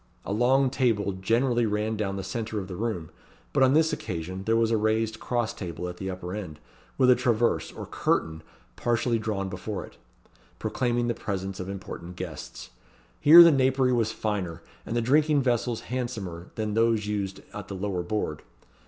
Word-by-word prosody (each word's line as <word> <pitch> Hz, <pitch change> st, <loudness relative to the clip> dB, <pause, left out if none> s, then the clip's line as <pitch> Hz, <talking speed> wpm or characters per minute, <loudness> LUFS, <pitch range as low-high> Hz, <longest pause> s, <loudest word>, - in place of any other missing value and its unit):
A -, -, -2 dB
long 130 Hz, +4 st, +3 dB
table 115 Hz, -7 st, +1 dB
generally 115 Hz, +5 st, +1 dB
ran 105 Hz, +1 st, -1 dB
down 100 Hz, -2 st, -2 dB
the 95 Hz, -, -4 dB
centre 110 Hz, -2 st, -4 dB
of 95 Hz, -2 st, -3 dB
the 90 Hz, -, -6 dB
room; 105 Hz, -7 st, -3 dB, 0.4 s
but 140 Hz, -, +2 dB
on 130 Hz, +1 st, +5 dB
this 160 Hz, 0 st, +3 dB
occasion 95 Hz, +2 st, -5 dB
there 115 Hz, -, +2 dB
was 115 Hz, 0 st, +2 dB
a -, -, +3 dB
raised 110 Hz, 0 st, 0 dB
cross 120 Hz, -3 st, -1 dB
table 90 Hz, -2 st, -5 dB
at 90 Hz, 0 st, -7 dB
the 95 Hz, +1 st, -4 dB
upper 90 Hz, -1 st, -5 dB
end, 90 Hz, -8 st, -6 dB, 0.4 s
with 130 Hz, -1 st, +6 dB
a -, -, +7 dB
traverse, 120 Hz, -2 st, +1 dB
or -, -, -7 dB
curtain, 80 Hz, 0 st, -1 dB, 0.3 s
partially 120 Hz, -, +1 dB
drawn 105 Hz, -3 st, -2 dB
before 95 Hz, +2 st, -5 dB
it, -, -, -18 dB, 0.6 s
proclaiming 120 Hz, -1 st, 0 dB
the 120 Hz, -, +1 dB
presence 95 Hz, -3 st, -4 dB
of 95 Hz, 0 st, -5 dB
important 90 Hz, -2 st, -7 dB
guests. 90 Hz, -4 st, -7 dB, 0.5 s
Here 165 Hz, +4 st, +10 dB
the 170 Hz, -, +7 dB
napery 130 Hz, -2 st, +3 dB
was 115 Hz, -2 st, +1 dB
finer, 95 Hz, -6 st, -3 dB, 0.2 s
and 115 Hz, -, -3 dB
the 120 Hz, -, +2 dB
drinking 145 Hz, +3 st, +3 dB
vessels 120 Hz, -2 st, 0 dB
handsomer, 110 Hz, -9 st, -5 dB
than 110 Hz, -1 st, -2 dB
those 115 Hz, -1 st, +2 dB
used 100 Hz, -2 st, -3 dB
at -, -, -7 dB
the 100 Hz, -, -6 dB
lower 95 Hz, -1 st, -2 dB
board. 85 Hz, -5 st, -3 dB
110 Hz, 180 wpm, -27 LUFS, 95-120 Hz, 0.6 s, Here